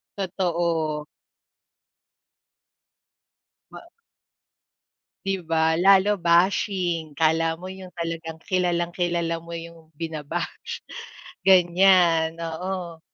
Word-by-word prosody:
Totoo. 170 -5 -1 2.6
Ma - - -12 1.4
'Di 195 0 -1
ba 160 0 +2 0.2
lalo 195 +2 +5
bashing, 175 -2 +1
akala 160 +1 +2
mo 185 - -8
yung 190 -1 -11
talagang 165 -1 -5
kilalang-kilala 175 -1 0
mo 170 +1 -10
yung 165 -1 -11
bina-bash. 155 -2 -5 0.6
Ganyan, 175 -3 +5
oo. 170 +1 -5
170 Hz, 75 wpm, -24 LUFS, 165-185 Hz, 2.6 s, lalo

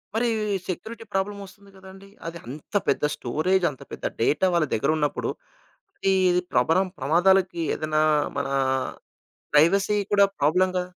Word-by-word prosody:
మరి 240 +2 +1 0.4
security 220 +6 -6
problem 200 +1 -2
వస్తుంది 200 +1 -15
కదండి! 190 +1 -14 0.2
అది 170 0 -6
అంత 145 - -10
పెద్ద - - +1
స్టోరేజ్ 165 +8 0
అంత 130 - -15
పెద్ద - - -7 0.2
డేటా 150 +10 +2
వాళ్ళ 170 -3 +3
దగ్గర 115 +6 0
ఉన్నప్పుడు, 150 -1 -1 0.8
అది 185 -2 +3
ప్రభరం 165 +10 +2
ప్రమాదాలకి 175 +4 +2
ఏదైనా 155 0 0 0.3
మనా 140 -1 -2 1.0
ప్రైవసీ 195 +7 +4 0.2
కూడా 200 -1 +6
ప్రాబ్లమ్‌గా 180 +5 +2
180 Hz, 125 wpm, -24 LUFS, 155-195 Hz, 1.0 s, కూడా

